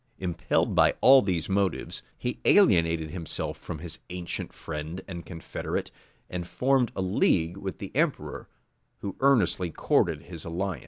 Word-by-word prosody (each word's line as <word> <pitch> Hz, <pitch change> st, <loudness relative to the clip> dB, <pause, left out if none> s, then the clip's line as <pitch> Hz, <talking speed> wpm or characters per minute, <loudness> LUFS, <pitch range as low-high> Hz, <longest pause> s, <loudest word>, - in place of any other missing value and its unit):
Impelled 90 Hz, -1 st, 0 dB
by -, -, +4 dB
all 135 Hz, +1 st, +8 dB
these 90 Hz, -5 st, -1 dB
motives, 95 Hz, -1 st, -1 dB, 0.2 s
he 125 Hz, -, -3 dB
alienated 85 Hz, -, +4 dB
himself 85 Hz, -3 st, -4 dB
from -, -, -7 dB
his 80 Hz, +1 st, -8 dB
ancient 90 Hz, -1 st, -5 dB
friend 80 Hz, +3 st, -6 dB
and 85 Hz, -4 st, -7 dB
confederate, 80 Hz, -3 st, -4 dB, 0.4 s
and 90 Hz, -1 st, -5 dB
formed 130 Hz, 0 st, +2 dB
a -, -, -2 dB
league 90 Hz, -2 st, +2 dB
with 95 Hz, -1 st, -5 dB
the 100 Hz, -, -8 dB
emperor, 155 Hz, 0 st, -1 dB, 0.5 s
who 100 Hz, -2 st, -4 dB
earnestly 120 Hz, -9 st, +3 dB
courted -, -, +1 dB
his 85 Hz, -3 st, -9 dB
alliance. 90 Hz, -1 st, -3 dB
90 Hz, 145 wpm, -27 LUFS, 85-100 Hz, 0.5 s, all